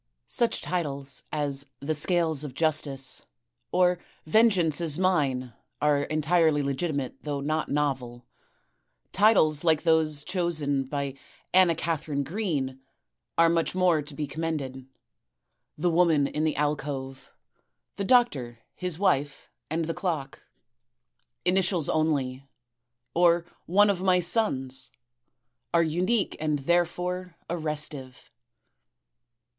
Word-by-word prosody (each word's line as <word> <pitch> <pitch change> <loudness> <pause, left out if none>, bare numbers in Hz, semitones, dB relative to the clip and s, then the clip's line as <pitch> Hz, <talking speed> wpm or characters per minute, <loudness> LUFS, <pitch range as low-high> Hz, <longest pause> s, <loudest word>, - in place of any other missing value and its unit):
Such 235 -2 0
titles 140 -6 -3
as 140 -2 -2 0.2
"The 150 +3 -2
Scales 160 -1 +1
of 135 -4 -7
Justice," 145 -4 0 0.4
or 180 -1 +3 0.3
"Vengeance 175 -4 +3
is 160 -3 +2
Mine" 140 -10 +1 0.3
are 145 -1 +2
entirely 155 -1 +2
legitimate, 140 -1 -2
though 145 -2 -3
not 155 +2 -1
novel. 130 -4 -2 0.9
Titles 175 -8 +4
like 160 -2 +3
those 155 -3 +2
chosen 150 -6 -1
by 140 0 -3 0.4
Anna 180 -2 +5
Katharine 155 -3 -2
Green 145 -8 -2 0.6
are 165 - +6
much 165 +1 +1
more 180 -4 +3
to 145 0 -10
be 150 - -2
commended: 140 -4 -4 0.9
"The 175 +3 +1
Woman 165 -4 +4
in 150 +2 -1
the 155 - 0
Alcove," 140 -2 -3 0.7
"The 200 - -2
Doctor, 150 - +2 0.2
his 180 -3 -4
Wife 145 -7 0 0.2
and 160 +2 -1
the 165 - -2
Clock," 155 -8 -3 1.0
"Initials 180 -3 +1
Only" 140 -5 0 0.7
or 170 0 +4 0.2
"One 205 +4 +5
of 185 -2 -3
my 185 -1 +4
Sons," 135 - -1 0.9
are 170 - +5
unique 180 +7 0
and 155 -1 0
therefore 175 +3 -1 0.2
arrestive. 150 -6 -3
155 Hz, 110 wpm, -27 LUFS, 140-175 Hz, 1.0 s, are